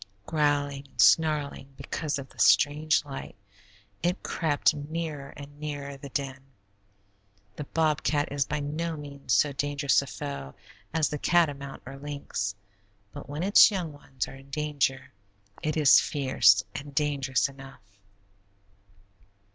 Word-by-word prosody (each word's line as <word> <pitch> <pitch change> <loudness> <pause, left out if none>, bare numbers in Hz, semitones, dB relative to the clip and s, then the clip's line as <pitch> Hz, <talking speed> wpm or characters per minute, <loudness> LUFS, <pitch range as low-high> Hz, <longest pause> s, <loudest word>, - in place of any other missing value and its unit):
Growling 145 -2 0
and 135 - -27
snarling 140 +5 +3
because 155 -2 -3
of 135 -1 -7
the - - -19
strange 150 +1 +4
light, 135 -2 -8 0.7
it 175 +3 -1
crept 150 -4 +1
nearer 150 -1 -5
and 145 +1 -11
nearer 145 -2 -5
the 140 +1 -10
den. 135 -1 -4 1.1
The 150 - -6
bobcat 150 -2 0
is 140 -1 +1
by 150 0 -2
no 160 +3 -3
means 140 -3 -8
so 140 +8 +4
dangerous 145 -1 +1
a 140 - -8
foe 130 - -6 0.4
as 160 -1 +1
the 150 - -4
catamount 145 -6 +1
or 135 - -8
lynx, 140 -9 -4 0.6
but - - -10
when 150 +4 -3
its 200 +2 +8
young 180 -7 -3
ones 135 -2 -5
are - - -10
in 135 +1 -14
danger, 140 -3 -1 0.5
it 155 +1 -1
is 150 -3 +7
fierce 115 -8 +3
and 140 0 -8
dangerous 140 -3 +1
enough. 135 -3 -13
145 Hz, 135 wpm, -27 LUFS, 135-150 Hz, 1.1 s, its